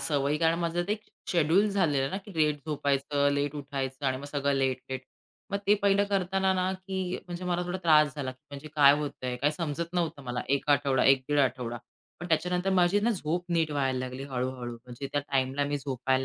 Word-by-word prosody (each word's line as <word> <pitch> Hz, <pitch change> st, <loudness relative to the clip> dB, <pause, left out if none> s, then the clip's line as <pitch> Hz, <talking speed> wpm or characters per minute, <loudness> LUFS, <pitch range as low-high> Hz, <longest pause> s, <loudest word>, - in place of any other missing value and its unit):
सवयी 140 Hz, +1 st, +1 dB
कारण 165 Hz, 0 st, +2 dB
माझं 170 Hz, 0 st, 0 dB
ते, 210 Hz, -, +1 dB, 0.3 s
शेड्यूल 175 Hz, +5 st, +3 dB
झालेलं 170 Hz, -9 st, +1 dB
आहे 135 Hz, -, -1 dB
ना 190 Hz, -, -2 dB
की 205 Hz, -, -11 dB
लेट 150 Hz, -2 st, +2 dB
झोपायचं, 145 Hz, -1 st, +1 dB
लेट 145 Hz, +1 st, -1 dB
उठायचं 135 Hz, -1 st, -4 dB
आणि 130 Hz, 0 st, +1 dB
मग 140 Hz, -, -8 dB
सगळं 140 Hz, -1 st, -1 dB
लेट-लेट. 130 Hz, -1 st, -1 dB, 0.5 s
मग 200 Hz, -, 0 dB
ते 205 Hz, -, +6 dB
पहिलं 200 Hz, 0 st, +4 dB
करतांना 190 Hz, 0 st, +1 dB
ना 185 Hz, +1 st, 0 dB
की 185 Hz, -1 st, -3 dB
म्हणजे 175 Hz, 0 st, -6 dB
मला 180 Hz, 0 st, 0 dB
थोडा 180 Hz, +1 st, -3 dB
त्रास 150 Hz, -3 st, +5 dB
झाला. 140 Hz, -3 st, -3 dB, 0.2 s
म्हणजे 145 Hz, +2 st, -8 dB
काय 140 Hz, -2 st, +7 dB
होतंय 130 Hz, -4 st, -4 dB
काय 145 Hz, +4 st, +2 dB
समजत 165 Hz, +2 st, -3 dB
नव्हतं 165 Hz, -5 st, -1 dB
मला 125 Hz, -1 st, -3 dB
1 140 Hz, +1 st, 0 dB
आठवडा, 140 Hz, -2 st, +3 dB
एक 135 Hz, -1 st, +5 dB
दीड 145 Hz, -, +2 dB
आठवडा. 125 Hz, -3 st, 0 dB, 0.4 s
पण 175 Hz, -, -6 dB
त्याच्यानंतर 180 Hz, +4 st, +1 dB
माझी 185 Hz, +2 st, +3 dB
ना 235 Hz, +3 st, +2 dB
झोप 175 Hz, -3 st, -2 dB
नीट 165 Hz, -2 st, +2 dB
व्हायला 135 Hz, -3 st, 0 dB
लागली 130 Hz, +1 st, -5 dB
हळू-हळू 125 Hz, -2 st, -3 dB
म्हणजे 125 Hz, +3 st, -8 dB
त्या 145 Hz, -, +1 dB
टाईमला 135 Hz, 0 st, 0 dB
मी 145 Hz, 0 st, -1 dB
झोपायला 130 Hz, -1 st, -1 dB
145 Hz, 200 wpm, -28 LUFS, 135-175 Hz, 0.5 s, काय